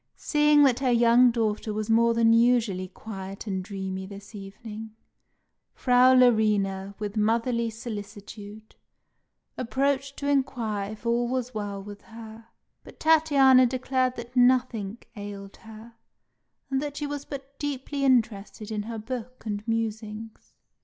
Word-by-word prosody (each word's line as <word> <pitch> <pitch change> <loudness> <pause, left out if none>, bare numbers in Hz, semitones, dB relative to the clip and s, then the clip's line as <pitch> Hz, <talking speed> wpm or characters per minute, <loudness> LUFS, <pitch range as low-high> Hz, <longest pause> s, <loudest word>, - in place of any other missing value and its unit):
Seeing 295 -1 +4
that 265 -3 +3
her 265 -2 +1
young 240 +1 +5
daughter 220 -2 -1
was 215 0 -3
more 230 +1 +3
than 230 -1 +4
usually 230 -6 +2
quiet 195 0 -8
and 190 -3 -3
dreamy 190 -1 -5
this 200 +2 -11
evening, 210 +2 -9 0.8
Frau 255 0 +5
Larina, 205 -5 +2
with 210 0 -5
motherly 230 +2 +1
solicitude, 210 -1 -9 0.9
approached 275 +2 -1
to 280 - -4
inquire 235 -7 -1
if 220 - -14
all 235 +1 +1
was 250 0 -3
well 205 -2 -4
with 205 0 -10
her; 225 0 -12 0.4
but - - -15
Tatiana 280 -5 +5
declared 255 0 -1
that 240 +1 -9
nothing 245 -4 +2 0.2
ailed 200 -1 -8
her, 225 +1 -13 0.8
and 265 0 +1
that 290 -1 -5
she 295 - -3
was 290 -1 -4
but 275 -1 -9
deeply 285 -1 -3
interested 220 -4 0
in 210 -1 -2
her 225 +2 -6
book 245 +2 -7
and 205 -1 -3
musings. 220 -1 -4
230 Hz, 135 wpm, -26 LUFS, 210-255 Hz, 0.9 s, young